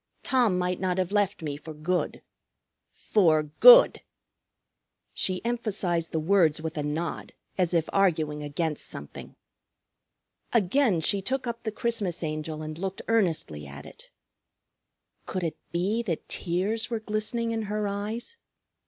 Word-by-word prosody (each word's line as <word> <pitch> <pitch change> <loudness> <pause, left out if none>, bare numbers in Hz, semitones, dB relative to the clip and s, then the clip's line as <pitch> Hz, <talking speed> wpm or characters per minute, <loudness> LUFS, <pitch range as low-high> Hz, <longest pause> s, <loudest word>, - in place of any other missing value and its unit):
Tom 240 -8 +2
might 180 0 -1
not 185 -1 -1
have 185 0 -1
left 205 -4 0
me 145 -2 -3
for 155 +1 -9
good. 175 +4 -2 0.7
For 160 -7 +3
good." - - +7 1.1
She 185 +3 -1
emphasized 200 -8 0
the 160 - 0
words 165 -2 +3
with 160 0 -5
a 150 - -2
nod 155 +3 -4 0.2
as 180 -3 +1
if 165 -3 +1
arguing 155 -6 +1
against 150 +1 -3
something. 70 - -9 1.2
Again 220 - +2
she 200 +4 +1
took 260 +6 -2
up 235 -1 -4
the 220 - -3
Christmas 210 -7 -1
Angel 155 0 -4
and 155 +1 -7
looked 195 0 -4
earnestly 165 - 0
at 70 +1 -10
it. - - -14 1.2
Could 185 - -3
it 165 - -3
be 190 +7 0
that 180 -9 -4
tears 190 +6 -1
were 230 -2 -2
glistening 220 +2 -2
in 225 0 -1
her 210 0 -1
eyes? 215 - -4
185 Hz, 140 wpm, -27 LUFS, 160-215 Hz, 1.2 s, good